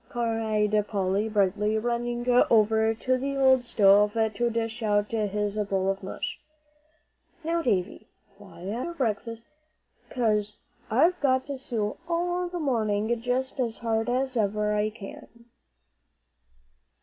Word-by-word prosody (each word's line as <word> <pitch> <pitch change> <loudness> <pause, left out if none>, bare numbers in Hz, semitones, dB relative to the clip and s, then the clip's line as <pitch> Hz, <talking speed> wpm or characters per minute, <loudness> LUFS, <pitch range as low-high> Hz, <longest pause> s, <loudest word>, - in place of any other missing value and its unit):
cried 225 -3 0
Polly, 200 +1 0
brightly, 210 +1 +1
running 240 +1 -2 0.2
over 220 0 +4
to 255 +3 0
the 275 +1 -2
old 260 -2 +4
stove 205 -2 +4
to 225 +1 0
dish 230 0 -3
out 205 -1 +1
his 210 -1 -1
bowl 195 -2 0
of 195 - -6
mush. 190 - -5 1.0
"Now, 335 +1 0
Davie, 200 - -1 0.3
fly 190 -4 -14
at 220 +6 -3
your 345 - -5
breakfast, 230 -3 -3 0.6
'cause 210 -4 0 0.3
I've 325 +11 +3
got 260 -2 +2
to 280 -1 -5
sew 220 -5 -2
all 350 +1 0
the 355 - -5
morning 225 -6 0
just 255 +3 -2
as 235 -3 -1
hard 225 +1 0
as 260 +1 0
ever 210 -1 0
I 210 0 +1
can." 220 +2 -12
225 Hz, 130 wpm, -27 LUFS, 210-250 Hz, 1.0 s, over